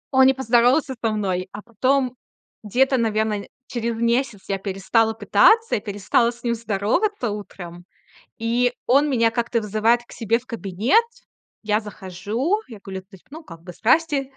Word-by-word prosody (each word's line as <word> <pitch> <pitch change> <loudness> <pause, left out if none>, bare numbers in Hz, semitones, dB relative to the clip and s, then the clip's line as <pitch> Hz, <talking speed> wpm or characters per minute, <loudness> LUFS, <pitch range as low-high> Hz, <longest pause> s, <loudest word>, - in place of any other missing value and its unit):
Он 265 0 +7
не 265 - +4
поздоровался 260 +3 +2
со 225 -2 +1
мной, 190 -3 -2
а 205 0 -8
потом 255 +3 0 0.5
где-то, 260 +5 +2
наверно, 215 -2 -1 0.2
через 235 -1 -3
месяц 235 -2 0
я 195 -1 -2
перестала 205 +4 0
пытаться 225 - +4
и - - 0
перестала 205 +3 +1
с 240 0 -10
ним 235 -1 0
здороваться 230 - -1
утром, 175 -4 -8 0.6
и 240 +2 +1
он 285 +3 +4
меня 230 -3 +3
как-то 235 0 -1
вызывает 220 +3 +2
к - - -16
себе 230 0 0
в 250 - -20
кабинет. 225 - +1 0.6
Я 210 0 +1
захожу, 215 - -3
я 220 -4 -11
кулю 190 -1 -7
то 185 - -39
есть, 190 - -16
ну, 315 +3 -10
как 165 -2 -12
бы: 180 -1 -10
"Здрасте, 275 +1 +1
230 Hz, 165 wpm, -22 LUFS, 205-255 Hz, 0.6 s, Он